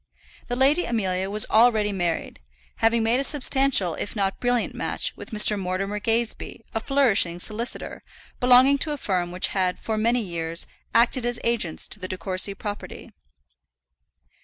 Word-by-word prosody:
The 245 - -2
Lady 280 +7 +3
Amelia 190 -4 -2
was 210 +1 +1
already 220 -2 +4
married, 175 -4 -3 0.4
having 225 0 +2
made 230 +3 +2
a - - 0
substantial 270 - +2
if 205 - -5
not 195 -2 0
a - - -25
brilliant 245 -1 0
match - - -1
with - - -10
Mr. 210 -2 +4
Mortimer 195 +2 -3
Gazebee, 225 0 -2
a 225 - -1
flourishing 225 -10 +2
solicitor, 225 +5 -4 0.4
belonging 255 +2 +5
to 300 +3 +1
a - - -5
firm 180 -8 -2
which 180 +1 -1
had 185 -2 -1
for 220 -1 -3
many 235 +3 +2
years 170 -3 -2 0.3
acted 240 +2 +3
as 240 0 -2
agents 230 -9 +1
to 210 - -5
the 185 - -5
De 185 - -5
Courcy 185 +3 0
property. 205 0 -8
215 Hz, 160 wpm, -24 LUFS, 185-245 Hz, 0.4 s, belonging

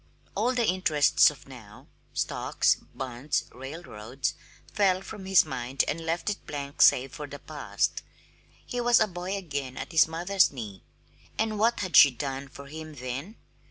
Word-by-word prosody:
All 255 +1 0
the 240 -2 +2
interests 160 -7 +4
of 140 -2 -13
now 115 -6 -13 0.3
stocks, - - +1 0.2
bonds, 130 +2 -2
railroads 130 -3 -5 0.4
fell 190 -3 +2
from 200 -2 -9
his 190 -2 +6
mind 125 +3 -1
and 165 - -2
left 165 +1 -2
it 205 - -7
blank 140 -1 -5
save 130 +1 +5
for 150 -3 -6
the 145 - -8
past. - - -2 0.6
He 245 - -3
was 240 0 +5
a 220 - +5
boy 185 0 -4
again 140 -8 -5
at - - -6
his 160 -1 +5
mother's 175 +4 +2
knee. 105 -8 -8 0.6
And 220 -1 -1
what 230 +2 +2
had 185 -3 -2
she 145 - +10
done 135 +1 -5
for 140 +1 -12
him 155 +2 -9
then? 130 - -6
150 Hz, 160 wpm, -27 LUFS, 135-190 Hz, 0.6 s, she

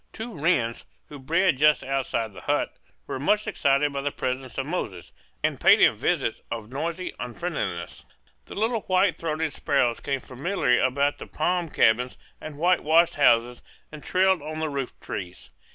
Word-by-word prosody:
Two 225 +1 -7
wrens, 140 -7 0 0.3
who 145 - -9
bred 165 +2 +1
just 150 0 +4
outside 130 -5 -2
the - - -11
hut, - - -1 0.3
were - - -5
much 210 +10 +2
excited 140 +1 +1
by 140 - -2
the 145 - -1
presence 130 -1 -4
of 135 - -1
Moses, 120 - -4 0.3
and - - 0
paid - - +7
him - - +5
visits - - -1
of 115 -1 -6
noisy 170 +6 -3
unfriendliness. 120 - -4 0.4
The - - -10
little 225 +1 0
white 185 -2 +2
throated 160 -1 -2
sparrows 125 -5 +1
came 135 -1 -2
familiarly 130 -1 0
about 140 +3 +1
the - - -8
palm 175 +1 -1
cabins 125 -1 +2 0.2
and 155 -2 -8
whitewashed 170 0 +3
houses 120 -4 +3 0.3
and 150 -1 -10
trilled 190 -2 +2
on 155 +1 -6
the 160 0 -2
rooftrees. 125 -9 -6
145 Hz, 160 wpm, -25 LUFS, 125-170 Hz, 0.4 s, paid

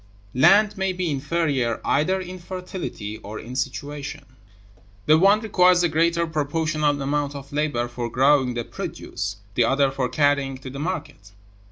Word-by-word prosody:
Land 200 +9 +5
may 190 -1 0
be 180 -3 -2
inferior 140 -5 0
either 185 +7 +2
in 185 0 -7
fertility 180 - -6
or 105 +2 -8
in 125 +3 -8
situation. 140 +2 -4 0.8
The 155 +1 +5
one 200 +4 +5
requires 180 -4 +4
a 175 - +3
greater 170 +2 +2
proportional 155 -1 0
amount 145 +1 -1
of 140 0 -9
labor 145 -5 0
for 120 -1 -5
growing 130 0 +3
the 120 - -2
produce, 100 -2 -5 0.2
the 120 +2 +3
other 135 +2 +2
for 135 -2 -2
carrying 140 0 +1
it 130 - -20
to 135 +1 -7
market. 145 - -5
145 Hz, 155 wpm, -23 LUFS, 130-170 Hz, 0.8 s, Land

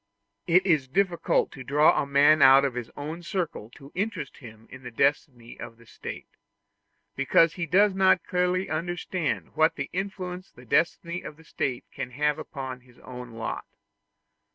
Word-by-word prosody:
It 180 +2 +4
is 155 -8 +2
difficult 180 +4 +1
to 130 - -9
draw 150 +4 +4
a - - -4
man 145 +2 +5
out 135 +1 +8
of 135 - -1
his 120 -1 -5
own 155 +4 -6
circle 170 - -4
to 140 -1 -14
interest 185 -7 -4
him 115 -4 -13
in 130 - -10
the 125 - -8
destiny 120 -1 -1
of 115 - -9
the 115 - -19
State, - - -8 0.9
because 155 +4 +3
he 170 -1 -4
does 195 +5 +4
not 190 -1 +3
clearly 180 +1 0
understand 175 +1 -3
what 160 +1 +3 0.2
influence 185 -1 -5
the 125 - -17
destiny 170 +5 0
of 150 - -9
the 160 - -17
State 130 -6 -3
can 135 -2 -5
have 150 +2 0
upon 130 -3 -7
his 125 -1 -22
own 125 -2 -10
lot. 115 0 -5
150 Hz, 165 wpm, -26 LUFS, 130-180 Hz, 0.9 s, out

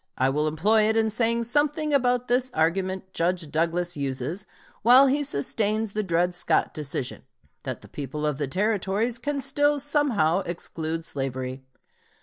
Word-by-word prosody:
I 130 +1 +2
will 150 +2 0
employ 210 +8 +3
it 220 - +1
in 220 -1 +2
saying 230 +1 +1
something 295 +4 0
about 250 -2 +2
this 250 +1 +1
argument 185 +3 0
Judge 170 -2 -1
Douglas 170 +2 0
uses, 140 +7 -3 0.3
while 250 +4 +7
he 275 +2 +2
sustains 215 - -1
the 215 - 0
Dred 175 -2 +1
Scott 175 - 0
decision, 140 -4 -4 0.4
that - - -5
the - - -14
people 150 +1 -5
of 150 -2 -1
the 145 - -1
Territories 210 - 0
can 285 +3 -2
still 290 +2 +2
somehow 270 - +2
exclude 165 -1 -4
slavery. 130 -2 -4
190 Hz, 150 wpm, -25 LUFS, 155-240 Hz, 0.4 s, while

